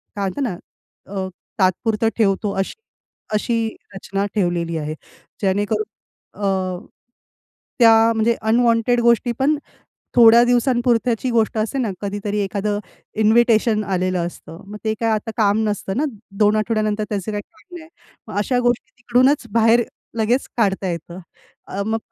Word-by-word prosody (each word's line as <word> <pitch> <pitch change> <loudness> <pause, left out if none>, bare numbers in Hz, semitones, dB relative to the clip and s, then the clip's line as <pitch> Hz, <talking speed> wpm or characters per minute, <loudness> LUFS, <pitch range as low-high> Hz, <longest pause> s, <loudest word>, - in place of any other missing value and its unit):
काय 200 -1 -1
म्हणतात 285 - -5
ना 225 -9 -2 0.6
अ, 190 -1 -2 0.3
तात्पुरतं 210 +4 +2
ठेवतो 200 -1 +1
अशी 195 - -1 0.6
अशी 230 +1 0 0.3
रचना 195 +1 -3
ठेवलेली 175 -4 0
आहे. 155 0 -3 0.5
जेणेकरून 205 +2 0 0.6
अ, - - +2 1.3
त्या 230 -2 +8 0.2
म्हणजे 225 +1 +2
अनवॉन्टेड 230 +1 +2
गोष्टी 235 +1 +3
पण 295 +3 +2 0.6
थोड्या 235 0 +8
दिवसांपुरत्याची 240 -1 +1
गोष्ट 225 -1 +1
असते 220 +5 -1
ना 240 -5 0
कधीतरी 205 +1 -3
एखादं 205 +1 -1 0.4
इन्व्हिटेशन 220 0 +4
आलेलं 185 -2 -1
असतं. 170 -1 -10
मग 210 +1 -8
ते 220 0 0
काय 230 -1 +1
आता 215 0 -1
काम 205 -1 +3
नसतं 200 -2 -3
ना 285 - +1 0.4
2 210 0 +4
आठवड्यानंतर 215 -1 0
त्याचे 205 0 -3
काही 205 0 -3
काम 350 +2 -15
नाही. 320 -1 -13 0.4
मग 210 - -4
अशा 245 +5 +1
गोष्टी 245 -1 0
तिकडूनच 250 +3 +2
बाहेर 230 +1 +4 0.4
लगेच 240 +5 +1
काढता 195 -4 +1
येतं. 170 +1 -6 0.5
अ, 200 - -3
मग 220 +1 0
215 Hz, 140 wpm, -20 LUFS, 200-235 Hz, 1.3 s, त्या